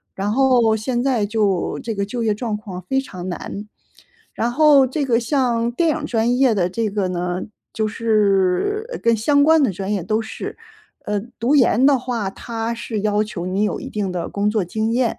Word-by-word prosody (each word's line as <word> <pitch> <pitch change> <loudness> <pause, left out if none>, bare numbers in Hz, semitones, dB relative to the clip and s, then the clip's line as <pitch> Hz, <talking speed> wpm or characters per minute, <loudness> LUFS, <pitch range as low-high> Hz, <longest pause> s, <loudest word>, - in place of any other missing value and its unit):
然 200 +2 -2
后 250 -4 +4
现 240 +3 -1
在 250 -6 +1
就 205 -4 0
这 225 -2 -3
个 200 - -1
就 235 +3 -4
业 215 -2 +2
状 215 -2 -3
况 190 -4 -8
非 265 0 +2
常 185 -7 -7
难。 200 +3 -6 0.7
然 235 +1 -1
后 285 -1 +5
这 280 +2 -2
个 235 -2 +2
像 240 -2 0
电 330 +6 +1
影 305 -1 -3
专 235 0 +1
业 255 -5 +3
的 180 -2 +1
这 220 +2 -1
个 200 -2 -1
呢 180 0 -2 0.3
就 220 -1 0
是 220 - +1
跟 230 -1 +4
相 285 +6 +3
关 320 0 +5
的 215 - +2
专 195 +3 -3
业 195 - -1
都 215 +4 0
是， 220 - -7 0.5
呃， 205 -1 -1 0.2
读 255 +6 +2
研 255 -1 +4
的 280 -3 +5
话， 235 -6 -3
它 230 +1 -4
是 225 -2 -4
要 210 0 +1
求 180 -4 -6
你 190 +3 -1
有 210 - -1
一 - - -7
定 200 -3 -2
的 175 -2 -3
工 205 +1 0
作 210 -4 0
经 220 +5 -1
验。 245 -2 +1
225 Hz, 215 characters per minute, -20 LUFS, 205-250 Hz, 0.7 s, 后